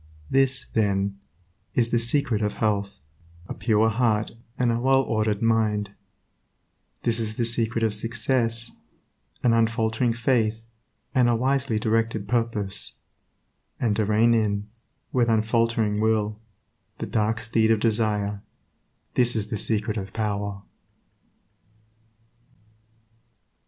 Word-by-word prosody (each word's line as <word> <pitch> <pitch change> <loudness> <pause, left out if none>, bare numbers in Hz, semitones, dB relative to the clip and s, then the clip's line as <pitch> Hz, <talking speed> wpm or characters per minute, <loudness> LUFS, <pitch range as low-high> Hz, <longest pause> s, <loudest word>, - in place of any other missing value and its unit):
This, 135 -1 +2
then, 100 -2 0 0.6
is 115 -2 +2
the 120 - +2
secret 115 -2 +1
of 105 -1 0
health, 100 -6 -1 0.5
a - - -5
pure 110 -1 +2
heart 110 -2 +1 0.3
and 125 -2 +2
a 115 - 0
well 135 +2 +3
ordered 110 -3 -1
mind; 105 -3 +1 1.1
this 115 -1 +1
is 110 -1 -3
the 120 - 0
secret 115 0 0
of 110 -2 +2
success, 115 +1 -1 0.7
an 120 - +4
unfaltering 115 +1 +1
faith, 115 -2 0 0.5
and 125 -3 +4
a 120 - +3
wisely 130 -1 0
directed 110 -1 0
purpose; 110 -4 +1 0.8
and 110 -4 +1
to 110 - +1
rein 110 +3 +3
in, 105 -2 0 0.5
with 120 -2 +2
unfaltering 115 -1 +1
will, 110 -1 0 0.6
the - - -4
dark 110 +1 0
steed 115 0 +1
of 110 -1 +3
desire, 105 -2 0 0.7
this 120 -1 +3
is 105 -1 -2
the - - -2
secret 110 +1 -1
of 95 -1 -6
power. 100 -2 -3
110 Hz, 120 wpm, -25 LUFS, 105-115 Hz, 1.1 s, an